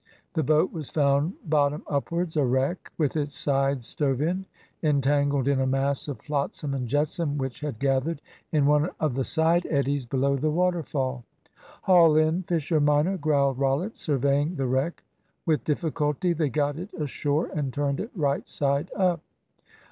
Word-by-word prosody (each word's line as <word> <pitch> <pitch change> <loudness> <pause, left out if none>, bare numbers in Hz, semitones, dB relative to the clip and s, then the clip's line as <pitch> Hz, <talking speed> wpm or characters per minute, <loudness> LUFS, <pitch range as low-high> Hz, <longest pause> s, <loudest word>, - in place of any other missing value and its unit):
The 160 - +1
boat 155 +4 +2
was 155 -5 -6
found 145 +3 +2
bottom 150 -1 +1
upwards 165 +4 -2
a 150 - +3
wreck, 130 +7 0
with 150 -3 0
its 145 -2 -2
side 135 -2 +1
stove 135 +1 -1
in, 180 +5 -1 0.3
entangled 140 -2 +2
in 140 -1 +2
a 130 - +1
mass 135 +2 0
of 140 -6 -5
flotsam 145 -1 -2
and 130 -3 -2
jetsam 145 +3 0
which 130 -3 -4
had 150 -6 -4
gathered 140 +5 0 0.3
in 150 -3 +3
one 150 +3 +3
of 155 -4 0
the 135 +1 -1
side 165 +4 +2
eddies 140 -3 0
below 135 +2 +1
the 155 +4 0
waterfall. 150 -7 -1 0.6
"Haul 170 -4 +6
in, 155 +3 +2
Fisher 165 -3 0
minor," 150 +6 +3
growled 140 -5 +1
Rollitt, 140 +10 0
surveying 145 +3 +1
the 135 -3 -1
wreck. 130 +6 -1 0.4
With 155 -3 +1
difficulty 150 +2 0
they 160 -3 0
got 145 +3 -1
it 185 +4 -7
ashore 145 +1 -1
and 145 -3 -2
turned 140 0 -1
it 220 - -4
right 145 -5 -1
side 140 +4 0
up. 180 -4 +1
145 Hz, 165 wpm, -26 LUFS, 140-160 Hz, 0.6 s, Haul